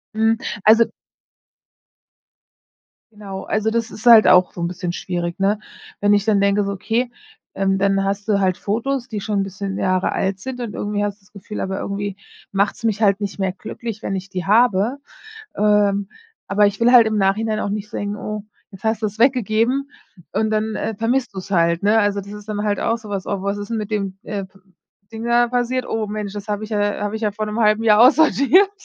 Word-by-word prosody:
Mhm, 225 +1 +2 0.3
also 225 +2 +6 2.3
Genau, 195 -2 -8
also, 215 +1 0
das 230 0 -1
ist 220 +3 -6
halt 225 -2 +9
auch 180 0 +5
so - - -10
'n 170 - 0
bisschen 180 0 -4
schwierig, 175 0 -4
ne? 200 +2 +1 0.4
Wenn 205 0 +4
ich 205 +1 0
dann 205 -3 +3
denke, 200 +1 +2
so 200 - -2
okay, 230 +5 -1 0.4
ähm, 195 0 +1
dann 195 0 +2
hast 200 +2 -2
du 200 -2 +2
halt 185 -1 +1
Fotos, 245 +5 -2
die 215 -4 -5
schon 205 -1 -1
'n - - 0
bisschen 195 0 -5
Jahre 185 0 0
alt 190 0 -1
sind 255 +2 -6
und 230 -4 -5
irgendwie 205 0 -2
hast 205 0 -3
du - - -28
das 210 - -26
Gefühl, 210 +1 -7
aber 190 0 -3
irgendwie 200 0 -4 0.4
macht's 200 +3 0
mich 220 -1 0
halt 200 0 +3
nicht 200 0 -4
mehr 190 -1 0
glücklich, 215 +3 -7
wenn 195 - -3
ich 190 +1 -6
die 185 -1 -4
habe. 225 +2 +3 0.6
Ähm. 205 -1 +2 0.4
Aber 205 +1 +3
ich 200 0 -1
will 240 +2 +4
halt 235 -3 +8
im 215 -1 0
Nachhinein 215 +2 +1
auch 200 - -2
nicht 210 0 -4
denken: 205 0 -4
„Oh, 210 +1 -5 0.3
jetzt 195 +1 -14
hast 220 0 0
du's 215 0 -3
weggegeben“ 250 +2 +2 0.4
und 220 0 0
dann, 215 0 -1
äh, 225 - -3
vermisst 230 +1 -1
du's 190 0 -7
halt, 170 -2 +2
ne? 210 +2 +4
Also, 205 -1 +1
das 200 +1 -11
ist 210 0 -10
dann 210 -1 -3
halt 205 -1 0
auch 230 +1 0
so 215 -2 -12
was: 195 -2 -3
„Oh, 195 - -2
was 200 +1 -1
ist 205 0 -6
denn 230 - -1
mit 210 0 -5
dem, 195 -2 -3
äh, 205 -3 -4 0.7
Ding 225 +1 -6
da 240 0 +3
passiert? 250 +1 -1
Oh, 225 -1 -2
Mensch, 210 -1 -5
das 205 0 -7
habe 210 +1 -2
ich 215 - -10
ja 205 -1 0
habe 205 +1 -2
ich 220 - -8
ja 210 - +1
vor 215 +1 -3
'nem 215 +2 -3
1/2 215 0 +3
Jahr 210 -1 +5
aussortiert, 310 - +5
210 Hz, 215 wpm, -20 LUFS, 195-225 Hz, 2.3 s, halt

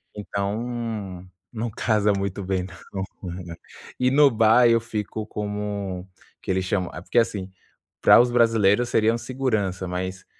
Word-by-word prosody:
Então, 105 -2 -4 0.3
não 115 +1 -3
casa 105 -1 +1
muito 100 0 -3
bem 95 -1 -1 0.3
não 95 -1 -2 0.2
com 90 - -5
ela 85 -1 -8 0.4
E 125 - +3
no 145 0 +6
bar, 115 +2 +5
eu 115 0 +4
fico 110 -1 -4
Como 105 -3 -4 0.3
que - - -11
eles 95 0 0
chamam? 95 -1 -1
É, 90 - -7
porque 120 - +2
assim, 100 -4 -1 0.5
para - - +8
os 120 0 +1
brasileiros 115 -1 +3
seria 110 0 +3
um - - -1
segurança, 110 -9 -2
mas, 90 +1 -4
105 Hz, 155 wpm, -24 LUFS, 95-115 Hz, 0.5 s, para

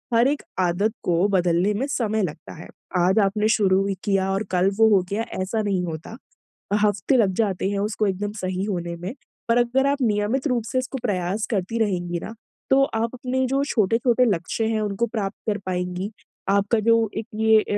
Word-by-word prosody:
हर 235 +2 +5
एक 285 +1 0 0.2
आदत 185 +5 +1
को 175 +2 +2
बदलने 180 +1 +2
में 255 +7 -1
समय 220 -6 0
लगता 155 -2 -6
है। 160 - -10 0.3
आज 185 +4 +3
आपने 210 +2 +2
शुरू 195 -3 +3
ही 195 - -1
किया 195 -1 +1
और 195 +2 0
कल 185 +1 +3
वो 225 - +7
हो 190 - +4
गया 215 +3 0 0.2
ऐसा 215 +4 -1
नहीं 195 -3 0
होता। 165 +7 -7 0.7
हफ्ते 210 +6 +2
लग 200 -5 +3
जाते 195 -3 0
हैं 200 - -1
उसको 210 +1 0
एकदम 200 +2 -2
सही 185 0 -2
होने 175 -4 -3
में। 180 +6 -5 0.4
पर 235 - +4
अगर 260 +3 +2
आप 280 0 0
नियमित 225 +5 +1
रूप 245 -3 0
से 255 - +1
उसको 255 +1 -4
प्रयास 195 0 -1
करती 210 +2 -1
रहेंगी 175 -5 -1
ना 225 - -7 0.4
तो 275 +1 +5
आप 230 +2 -1
अपने 255 +1 -1
जो 275 +2 +1
छोटे-छोटे 235 +1 +2
लक्ष्य 200 +1 -1
है 215 - 0
उनको 210 +2 0
प्राप्त 215 -3 -3
कर 210 -1 +1
पाएँगी। 180 +2 -3 0.4
आपका 200 +3 +2
जो 230 -2 +4
एक 220 - -3
ये 220 0 +5
अ, - - -5
205 Hz, 195 wpm, -23 LUFS, 185-230 Hz, 0.7 s, वो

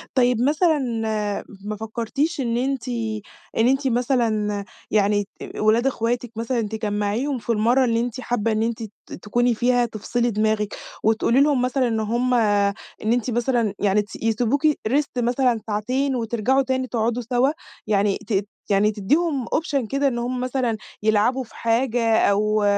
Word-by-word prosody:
طيّب، 245 -3 +3
مثلًا 310 +4 +3 0.9
ما 210 0 -3
فكرتيش 235 +9 -2
إن 235 -3 0
أنتِ 260 +1 -1 0.7
إن 225 - +4
أنتِ 270 +1 +2
مثلًا 230 -5 0 0.3
يعني 205 -1 +3 0.2
ت - - -8
ولاد 225 +4 +3
إخواتك 240 -1 -1
مثلًا، 230 +1 -1
تجمعيهم 215 +5 -1
في 235 - -3
المرّة 235 +4 +3
اللي 230 -1 +1
أنتِ 240 +1 -3
حابة 230 -2 0
إن 215 0 +1
أنتِ 230 0 -2 0.4
تكوني 240 +3 +1
فيها 245 +1 +2
تفصلي 235 +2 -1
دماغِك، 215 -1 0 0.3
وتقولي 225 +4 +3
لهُم 285 -3 +3
مثلًا 255 0 +1
إن 225 -1 0
هُم 240 +4 0
إن 205 -3 +3 0.4
أنتِ 245 0 0
مثلًا 235 -3 +1
يعني 205 +1 +3
تس 205 -2 -10
يسيبوكِ 235 +6 +1
Rest 285 -1 +1
مثلًا 245 -1 +2
ساعتين، 255 +6 0
وترجعوا 235 +3 +1
تاني 260 0 -1
تقعدوا 235 +1 -1
سوا، 255 +2 +3 0.4
يعني 200 -1 +2
تدّ 200 -2 0 0.2
يعني 205 +1 +3
تدّيهم 275 - 0
option 280 -6 -1
كده 275 +1 +1
إن 245 -3 -1
هُم 250 +1 -2
مثلًا 250 -3 -1 0.3
يلعبوا 220 +5 +2
في 235 - -18
حاجة، 230 -1 +1
أو 210 +1 +2
235 Hz, 150 wpm, -23 LUFS, 215-255 Hz, 0.9 s, إن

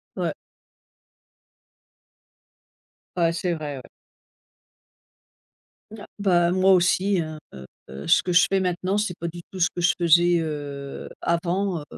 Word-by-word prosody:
Ouais. - - -2 2.8
Ouais, 165 -1 +3
c'est 175 +1 -1
vrai, 150 -3 -5
ouais. 130 - -11 2.1
N 220 - -9
ah, - - -11
bah, 175 -4 +2
moi 190 +1 +4
aussi, 185 +1 +2
hein, 155 -1 -4 0.2
heu, 65 +1 -11
ce - - +4
que 180 - -2
je 180 - +5
fais 195 - +3
maintenant, 185 +2 -1
c'est 205 -5 -2
pas 170 - -3
du 170 +1 -8
tout 190 - -8
ce 175 - +4
que 175 - -6
je 175 - +4
faisais, 170 +1 +4
heu, 145 -3 -6
avant, 175 +1 -1
heu - - -9
175 Hz, 140 wpm, -24 LUFS, 160-185 Hz, 2.8 s, je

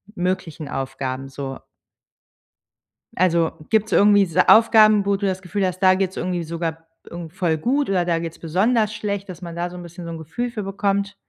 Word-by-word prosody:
möglichen 175 -4 -3
Aufgaben 135 0 -4
so 135 -1 -6 1.6
Also 170 -2 +2 0.2
gibt's 220 0 +1
irgendwie 205 -1 +5
diese 180 +1 +2
Aufgaben, 215 -2 +6
wo 200 0 +2
du 200 0 -3
das 190 0 -2
Gefühl 190 +1 -2
hast, 185 0 -3
da 185 -1 +5
geht's 190 -1 -2
irgendwie 180 -2 -2
sogar 165 0 -5 0.2
irgend 170 -1 -8
voll 170 -4 0
gut 270 - 0
oder 180 -3 +1
da 170 -1 +1
geht's 165 -1 -6
besonders 210 +6 +1
schlecht, 200 -2 -4
dass 180 0 -9
man 170 -1 -7
da 175 +1 -2
so 180 - -11
'n 175 - -8
bisschen 170 0 -10
so 165 - -6
'n 165 - -6
Gefühl 240 +11 -4
für 215 -3 -5
bekommt? 200 +1 -1
180 Hz, 190 wpm, -22 LUFS, 165-200 Hz, 1.6 s, Aufgaben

